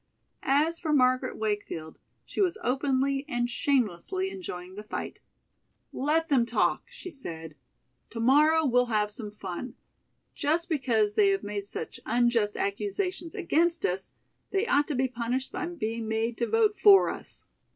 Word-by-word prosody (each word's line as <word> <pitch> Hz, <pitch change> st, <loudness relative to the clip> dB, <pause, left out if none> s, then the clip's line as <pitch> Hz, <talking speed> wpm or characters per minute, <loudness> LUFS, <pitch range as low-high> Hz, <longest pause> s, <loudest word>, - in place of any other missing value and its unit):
As 305 Hz, +5 st, +2 dB
for 320 Hz, -3 st, -2 dB
Margaret 255 Hz, -2 st, +2 dB
Wakefield, 205 Hz, -7 st, -3 dB, 0.3 s
she -, -, -3 dB
was 365 Hz, -3 st, +2 dB
openly 270 Hz, +1 st, +1 dB
and 240 Hz, -1 st, 0 dB
shamelessly 270 Hz, -, 0 dB
enjoying 185 Hz, -, -7 dB
the 205 Hz, -, -7 dB
fight. 215 Hz, -, -6 dB, 0.7 s
"Let 315 Hz, +4 st, +1 dB
them 270 Hz, -6 st, +4 dB
talk," 235 Hz, 0 st, +1 dB
she 485 Hz, -7 st, -9 dB
said. 165 Hz, -, -7 dB, 0.6 s
"To 230 Hz, -, -7 dB
morrow 300 Hz, +6 st, +5 dB
we'll 250 Hz, -2 st, +3 dB
have 210 Hz, -2 st, 0 dB
some 210 Hz, 0 st, -7 dB
fun. 205 Hz, +3 st, -7 dB, 0.6 s
Just 330 Hz, +4 st, 0 dB
because 235 Hz, -9 st, +1 dB
they 405 Hz, -, +4 dB
have 390 Hz, 0 st, 0 dB
made 205 Hz, -1 st, -4 dB
such -, -, -6 dB
unjust 235 Hz, -4 st, +2 dB
accusations 330 Hz, -, -2 dB
against 345 Hz, -3 st, +1 dB
us 185 Hz, +1 st, -2 dB, 0.3 s
they 395 Hz, +2 st, 0 dB
ought 290 Hz, -9 st, +3 dB
to 295 Hz, -, -2 dB
be 260 Hz, +1 st, +2 dB
punished 250 Hz, +1 st, -3 dB
by 355 Hz, -, -3 dB
being 230 Hz, -9 st, -4 dB
made 225 Hz, +1 st, -1 dB
to 235 Hz, -, +1 dB
vote 430 Hz, -3 st, +2 dB
for 395 Hz, -1 st, +7 dB
us." -, -, -11 dB
255 Hz, 150 wpm, -28 LUFS, 215-325 Hz, 0.7 s, for